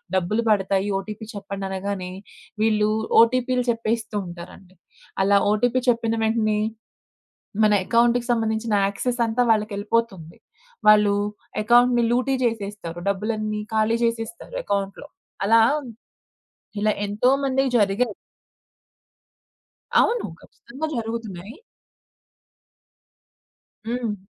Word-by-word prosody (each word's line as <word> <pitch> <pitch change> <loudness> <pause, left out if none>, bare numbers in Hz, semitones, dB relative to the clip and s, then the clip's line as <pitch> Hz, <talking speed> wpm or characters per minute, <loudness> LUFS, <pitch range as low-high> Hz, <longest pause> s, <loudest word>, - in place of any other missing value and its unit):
డబ్బులు 190 +5 0
పడతాయి 195 -1 +1
ఓటీపీ 210 +2 -8
చెప్పండనగానే, 195 -1 -4 0.5
వీళ్ళు 215 -1 +2 0.3
ఓటీపీలు 250 +1 +2
చెప్పేస్తూ 225 -1 -3
ఉంటారండి. 175 +2 -11 0.5
అలా 200 +1 +4
ఓటీపీ 245 +4 +2
చెప్పిన 230 -1 +1
వెంటనే, 220 -1 +1 1.0
మన 210 -1 +5
ఎకౌంట్‌కి 240 +1 +3
సంబంధించిన 220 -1 -1
యాక్సెస్ 245 +5 -3
అంతా 225 +2 0
వాళ్ళకెళ్ళిపోతుంది. 210 -4 -1 0.5
వాళ్ళు 210 -1 +6 0.5
ఎకౌంట్‌ని 240 +2 +4
లూటి 255 +3 +1
చేసేస్తారు. 205 -7 -3
డబ్బులన్నీ 215 +1 -2
ఖాళీ 220 +1 +2
జేసేస్తారు 230 - -3
ఎకౌంట్‌లో. 200 - -3 0.4
అలా 225 +2 +5 1.2
ఇలా 215 - +3
ఎంతో 205 +5 +1
మందికి 270 0 +1
జరిగాయి. 210 +2 +1 1.9
అవును. 470 0 +2 0.2
ఖచ్చితంగా 275 +3 -7
జరుగుతున్నాయి. 225 -3 -5 2.3
హ్మ్. 230 -4 -2
220 Hz, 85 wpm, -23 LUFS, 200-235 Hz, 2.3 s, వాళ్ళు